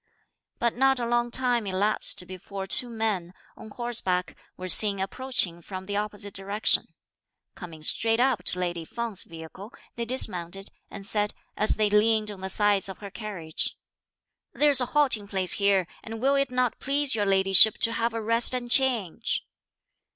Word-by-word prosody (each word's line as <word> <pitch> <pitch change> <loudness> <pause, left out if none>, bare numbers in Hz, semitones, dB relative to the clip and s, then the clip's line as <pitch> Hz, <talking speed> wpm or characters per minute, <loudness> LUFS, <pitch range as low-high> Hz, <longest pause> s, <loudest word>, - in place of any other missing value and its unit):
But 235 -1 -1
not 265 +1 +2
a 240 - -2
long 240 0 0
time 240 -3 +1
elapsed 195 -1 0
before 190 +2 -8
two 240 +5 +6
men, 210 -6 -3 0.2
on 220 - -12
horseback, 210 -7 -2 0.2
were 185 - -7
seen 200 +1 +6
approaching 190 -4 -2
from 185 +2 -8
the 200 +1 -5
opposite 205 -1 -4
direction. 200 +2 0 0.7
Coming 165 -4 -11
straight 225 +7 +2
up 250 -7 +1
to - - 0
lady 175 -2 -3
Feng's 230 +3 -5
vehicle 165 +6 -11 0.3
they 235 - -3
dismounted, 195 -6 -1 0.2
and 200 - -10
said, 210 0 -1 0.2
as 215 - +3
they 210 -1 0
leaned 215 0 +2
on 195 -2 -11
the 190 - -5
sides 205 0 +1
of 190 - -8
her 200 -1 -10
carriage, 185 -8 -3 0.8
"There's 290 -3 +4
a 250 - -1
halting 250 -9 +1
place 190 -2 0
here, 200 -2 +2 0.2
and 225 0 -8
will 270 +4 +1
it 275 -1 +1
not 250 -1 -1
please 280 0 +2
your 205 -2 0
ladyship 195 +2 +5
to 230 - 0
have 230 0 -2
a 225 - -4
rest 230 +3 +5
and 245 -1 -5
change?" 245 - 0
210 Hz, 165 wpm, -25 LUFS, 190-235 Hz, 0.8 s, two